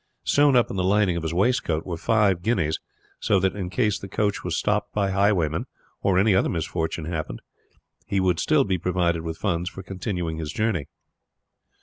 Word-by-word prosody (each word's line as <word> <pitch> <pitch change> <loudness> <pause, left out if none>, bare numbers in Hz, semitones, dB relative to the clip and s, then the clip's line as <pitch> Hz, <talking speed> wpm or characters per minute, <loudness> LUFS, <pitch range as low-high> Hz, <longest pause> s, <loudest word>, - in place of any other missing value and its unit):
Sewn 145 -1 +4
up 120 - +3
in - - -4
the 90 - +1
lining 95 -1 +3
of 85 - -2
his 80 0 -2
waistcoat 90 -4 +1
were 90 - -3
five 100 0 +2
guineas, 85 -7 0 0.4
so 100 - +2
that 95 +2 0
in 95 -3 -4
case 105 0 0
the 100 - -8
coach 100 +1 -1
was 90 -2 -2
stopped 105 0 0
by 100 -2 +1
highwaymen, 95 -5 +1 0.3
or 95 -2 +2
any 100 +2 +4
other 95 - +2
misfortune 80 -1 -2
happened, 80 -7 -4 0.7
he 100 - 0
would 90 -3 +1
still 155 -3 +3
be 95 -6 -1
provided 85 -1 0
with 80 0 -5
funds 90 -3 -1
for 95 - -9
continuing 90 -4 -4
his 80 -2 -4
journey. 100 -7 -1
95 Hz, 190 wpm, -24 LUFS, 85-105 Hz, 0.7 s, Sewn